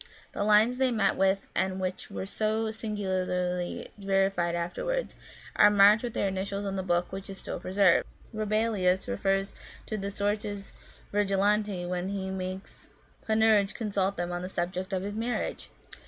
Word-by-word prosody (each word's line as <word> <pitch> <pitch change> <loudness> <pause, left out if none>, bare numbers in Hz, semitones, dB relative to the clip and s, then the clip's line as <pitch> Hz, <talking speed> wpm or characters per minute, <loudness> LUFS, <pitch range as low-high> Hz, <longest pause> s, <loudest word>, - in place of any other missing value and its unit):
The - - -2
lines 215 +4 +4
they 260 0 +3
met 215 -4 +2
with 195 +1 +2
and 190 0 0
which 185 0 -3
were - - -5
so 220 +2 -1
singularly 185 -4 -2
verified 195 -3 +1
afterwards, 340 - -2 0.4
are 205 - +7
marked 205 +1 +6
with 240 -2 -5
their - - +1
initials 195 +1 -3
in 195 -1 -2
the 190 - -1
book, 175 -1 0
which 195 +1 -6
is 195 - -7
still - - -5
preserved, 190 -1 +3 0.3
Rabelais 215 -3 +1
refers 195 - 0 0.3
to 215 - -4
the 200 +1 -3
Sortes 205 0 -3 0.4
Virgilianae 205 -1 +1
when 180 +1 -2
he 190 -1 -3
makes 185 0 -6 0.4
Panurge 220 -2 +3
consult 200 -3 -1
them 175 0 -2
on 175 0 -3
the 185 - -5
subject 185 +1 -3
of 190 -1 -1
his 205 +1 -4
marriage. 230 +3 -3
195 Hz, 155 wpm, -28 LUFS, 185-210 Hz, 0.4 s, are